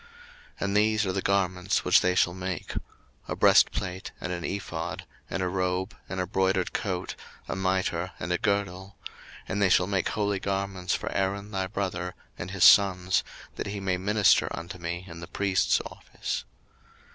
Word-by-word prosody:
02:028:004 - - -19
And 100 +1 +1
these 110 0 +3
are 95 - 0
the 95 +1 -1
garments 95 -2 +1
which - - +6
they 90 0 +2
shall 90 -1 +3
make; 90 -1 -4 0.5
a - - -2
breastplate, 95 +1 +3
and 90 - -3
an 85 -1 -4
ephod, 85 -4 -4 0.2
and 95 +1 -2
a - - +1
robe, 90 +1 -1
and 95 - -3
a 90 - 0
broidered 95 0 +1
coat, 95 -3 -2 0.3
a - - -3
mitre, 95 -2 0
and 85 +3 -2
a 90 - 0
girdle: 100 -1 -1 0.5
and 100 +2 -2
they 100 - +5
shall 90 - +5
make 95 -1 0
holy 100 -2 0
garments 95 -2 -1
for - - -4
Aaron 100 +2 -1
thy 95 -2 -1
brother, 90 -2 -3 0.2
and 85 - -6
his 95 -2 0
sons, 95 -2 +6 0.3
that - - -3
he 100 0 -4
may 95 -2 0
minister 105 +1 +4
unto 85 +3 -7
me 85 +2 -4
in 85 -1 -9
the 85 - -8
priest's 95 0 +2
office. - - -5
95 Hz, 175 wpm, -27 LUFS, 90-100 Hz, 0.5 s, which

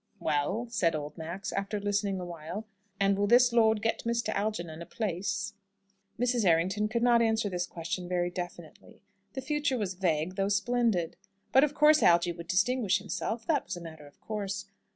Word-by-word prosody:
"Well," 155 +10 0
said 190 -8 +1
old 150 -1 -5
Max, 170 +4 -5
after 200 +1 -2
listening 200 -1 -1
awhile, 175 +4 -6 0.3
"and 195 0 +3
will 200 +1 +1
this 245 +2 +5
lord 220 -2 +4
get 225 - 0
Mr. 235 0 -1
Algernon 170 -6 -2
a - - -6
place?" 195 -1 -2 0.7
Mrs. 245 -1 +1
Errington 185 +4 +2
could 235 +2 -1
not 240 -1 +5
answer 220 -2 +1
this 175 0 -2
question 175 +1 -5
very 175 -1 0
definitely. 175 -2 -8 0.3
The 265 - -4
future 290 -1 0
was 200 -5 -2
vague, 180 -1 -1
though 195 0 +1
splendid. 205 -4 +1 0.3
But 265 - +6
of 295 -1 +1
course 300 +1 +6
Algy 175 0 +4
would 170 -1 -9
distinguish 205 +2 +2
himself. 215 +3 -4
That 295 -5 +1
was - - -5
a - - -8
matter 160 -3 -10
of 145 - -20
course. 205 -3 -4
200 Hz, 175 wpm, -29 LUFS, 175-230 Hz, 0.7 s, But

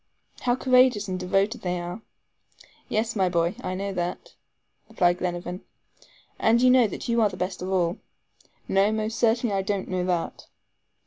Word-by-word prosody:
How 245 -1 +1
courageous 255 -5 +3
and 185 -1 -3
devoted 195 +5 0
they 180 -1 -2
are." 175 +4 -6 0.9
"Yes, 225 +1 -1
my 190 -3 +2
boy, 170 0 +1
I 185 - -3
know 200 +1 -3
that," 175 -1 -4 0.6
replied 180 -5 +2
Glenarvan. 175 0 -4 0.8
"And 225 +1 +4
do 245 - +3
you 255 - +7
know 250 -3 +5
that - - -7
you 235 -1 +2
are 215 - +4
the 185 - -9
best 180 0 -3
of 185 - -4
all." 180 -2 0 0.7
"No, 195 +2 +3
most 220 0 -2
certainly 230 -1 +2
I 195 - +1
don't 195 -1 -2
know 185 -1 -1
that." 175 -2 -2
195 Hz, 175 wpm, -25 LUFS, 180-225 Hz, 0.9 s, you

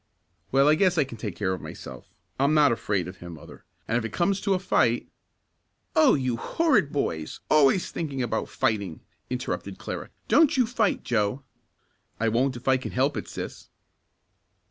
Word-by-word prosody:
"Well, 135 +2 +4
I 150 - +6
guess 180 +2 +3
I 155 - +5
can 120 -5 -10
take 105 -5 -4
care 95 +2 -1
of 95 - -5
myself. - - -9 0.3
I'm 140 +3 +3
not 150 -3 +5
afraid 100 -6 -1
of 90 0 -9
him, 85 -1 -9
mother, - - -14 0.2
and 115 +2 +1
if - - -5
it 115 - -4
comes 195 - 0
to 200 -2 +2
a - - +2
fight 185 - +1 0.5
" - - -48
"Oh, 315 -4 +6
you 130 -4 -1
horrid 225 - +2
boys 80 - -2
always 155 +4 +4
thinking 140 -6 -3
about 120 - -2
fighting!" 105 -9 -1 0.3
interrupted 125 0 -4
Clara. - - -6 0.2
"Don't 315 -4 +4
you 250 - +4
fight, 225 -3 0
Joe!" 115 +3 0 0.8
"I 115 +1 +2
won't 130 +4 +1
if 120 +2 -10
I 130 -1 +5
can 130 - -6
help 135 +3 +1
it, - - -4
sis." - - -7
135 Hz, 185 wpm, -26 LUFS, 110-170 Hz, 0.8 s, I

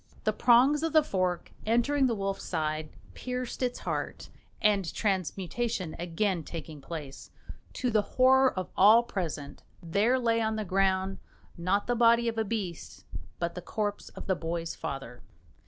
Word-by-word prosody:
The - - +1
prongs 255 +5 +5
of 325 -1 -1
the 310 -1 +6
fork, 185 -8 -1
entering 260 +5 +2
the 235 - 0
wolf's 195 -1 -2
side, 155 0 -2 0.2
pierced 250 0 -5
its 245 -1 0
heart; - - -4 0.3
and 200 -5 +2
transmutation 195 0 -2
again 175 +1 -1
taking 155 -2 -8
place, 145 -3 -8 0.4
to 250 - -1
the 215 -1 +4
horror 260 +4 +4
of 185 -1 -5
all 215 +5 +7
present 160 -10 -5 0.2
there 200 +9 +2
lay 230 -2 +1
on 220 0 0
the 215 -1 -3
ground, 190 0 +1 0.4
not 185 +4 0
the 245 - +1
body 235 0 +4
of 225 -1 -1
a - - +2
beast, 195 -6 -5 0.3
but 170 0 -2
the 180 - -6
corpse 205 +3 -3
of - - -10
the 190 - +1
boy's 165 0 -3
father. 135 -6 -6
200 Hz, 155 wpm, -29 LUFS, 170-235 Hz, 0.4 s, all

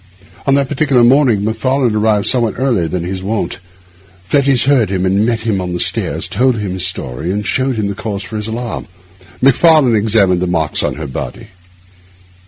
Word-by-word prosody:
On 135 - +4
that 140 -1 +1
particular 135 -4 +2
morning 120 -5 +3
Macfarlane 120 +2 0
arrived 105 -1 +1
somewhat 120 -5 0
earlier 120 -10 0
than 85 +2 -3
his 95 +1 -4
wont. 105 +3 -3 0.7
Fettes 135 +2 +2
heard 130 -8 +3
him, 95 -1 -1
and 100 +4 +1
met 115 -2 -1
him 110 -4 -1
on 90 -1 -4
the 90 - -3
stairs, - - 0
told 130 -1 +1
him 105 -3 -3
his 90 -1 +1
story, 80 -1 -3
and 105 +1 -3
showed 130 +3 0
him 110 -2 -2
the 100 - -3
cause 100 -2 -5
of - - -12
his 110 -1 -4
alarm. 115 +1 -5 0.6
Macfarlane 135 -2 +5
examined 100 -4 +2
the 90 - 0
marks 80 -4 -1
on 70 - -2
her 80 +1 -6
body. 65 - -7
110 Hz, 190 wpm, -15 LUFS, 95-130 Hz, 0.7 s, Macfarlane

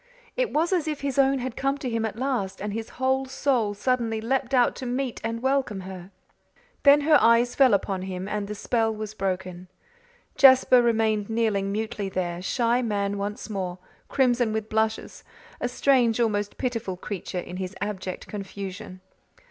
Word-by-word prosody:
It - - 0
was 330 +5 +1
as 340 -4 0
if 300 -2 -3
his 280 -1 -1
own 270 0 +4
had 255 -1 -4
come 275 +1 0
to 275 - -5
him 230 -2 -1
at 220 - -4
last 235 -7 -2
and 205 +1 -4
his 225 +1 -5
whole 265 +1 +1
soul 245 -6 0
suddenly 230 0 0
leaped 255 +3 -1
out 250 -3 +3
to 255 - -5
meet 250 0 -2
and 230 +1 -3
welcome 265 -7 0
her. 185 -1 -9 0.7
Then 285 +1 +6
her 300 0 +5
eyes 230 +1 +4
fell 265 -3 +5
upon 195 -1 -2
him 185 0 -5
and 205 -1 -3
the 210 - -5
spell 225 +1 0
was 215 -1 -6
broken. 185 -2 -4 0.7
Jasper 260 -2 +7
remained 220 -3 +1
kneeling 215 -4 0
mutely 215 -1 -3
there, 175 -2 -3
shy 235 +5 +1
man 205 -3 -1
once 205 +1 -4
more, 185 -4 -4 0.3
crimson 245 -4 +2
with 220 0 -3
blushes, 220 0 -1 0.4
a 245 - -1
strange, 245 -3 +2
almost 205 -3 0
pitiful 230 -7 -3
creature 185 -1 -6
in 180 0 -5
his 185 +1 -5
abject 190 -3 -4
confusion. 195 -1 -7
225 Hz, 170 wpm, -25 LUFS, 200-255 Hz, 0.7 s, Jasper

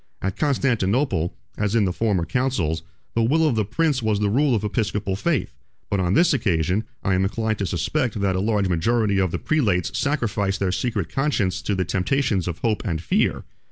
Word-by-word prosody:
At 95 -1 -2
Constantinople, 125 - +1 0.3
as 105 +1 0
in 110 -3 +4
the 90 - -1
former 100 -5 0
councils, 100 - 0 0.3
the 115 - +1
will 155 +8 +3
of 145 - +2
the 110 - +2
prince 135 +6 0
was 110 -2 +1
the 105 -1 +1
rule 135 +2 +3
of 105 - -1
episcopal 105 -2 -1
faith; 155 - -1 0.4
but 100 - +1
on 90 +1 +1
this 170 +4 +4
occasion, 95 - +1 0.2
I 95 - +1
am 95 - +2
inclined 110 +2 -1
to 100 - -1
suspect 110 - -1
that 95 -2 +1
a - - 0
large 105 -1 +1
majority 100 +4 +1
of 95 -1 +2
the - - -2
prelates 100 - 0
sacrificed 105 -8 0
their 95 -2 0
secret 105 -3 -1
conscience 105 -10 0
to 100 - -1
the 95 -1 0
temptations 95 - 0
of 85 -2 -3
hope 115 -4 0
and 85 -7 -2
fear. 80 - 0
105 Hz, 195 wpm, -23 LUFS, 95-125 Hz, 0.4 s, in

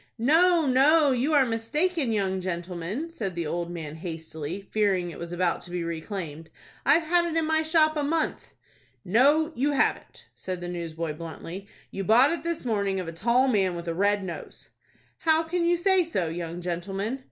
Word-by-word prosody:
"No, 325 +7 +4
no, 285 +3 +5
you 260 +5 +1
are 275 -2 +5
mistaken, 265 +6 0
young 190 -3 0
gentleman," 180 - -4
said 200 - -4
the 170 -1 -2
old 170 +2 -3
man, 160 -4 -6
hastily, 160 +1 -6
fearing 195 -5 +1
it 155 - -10
was 170 0 -6
about 175 0 0
to - - -12
be 175 -1 -3
reclaimed. 165 -2 -5 0.4
"I've 330 +2 +5
had 345 +2 +3
it 330 -1 -2
in 325 - +2
my 315 0 +2
shop 315 -1 +3
a 300 - 0
month." 315 +2 -1 0.6
"No, 285 - +4
you 285 +3 0
haven't," 285 - -1
said 185 -1 -5
the 175 - -6
newsboy, 165 -2 -4
bluntly; 165 +4 -8 0.2
"you 195 - -4
bought 240 - +5
it 335 - -1
this 335 -5 -3
morning 200 -4 0
of 180 - -5
a - - -4
tall 235 +10 +2
man, 195 -7 +1
with 170 0 -7
a 165 - -1
red 200 +3 +1
nose." 175 -3 -8 0.5
"How 320 0 +3
can 340 +2 -1
you 345 +1 +3
say 380 +1 +4
so, 190 - -2
young 170 +1 -5
gentleman?" 195 +7 -3
200 Hz, 185 wpm, -26 LUFS, -, 0.6 s, no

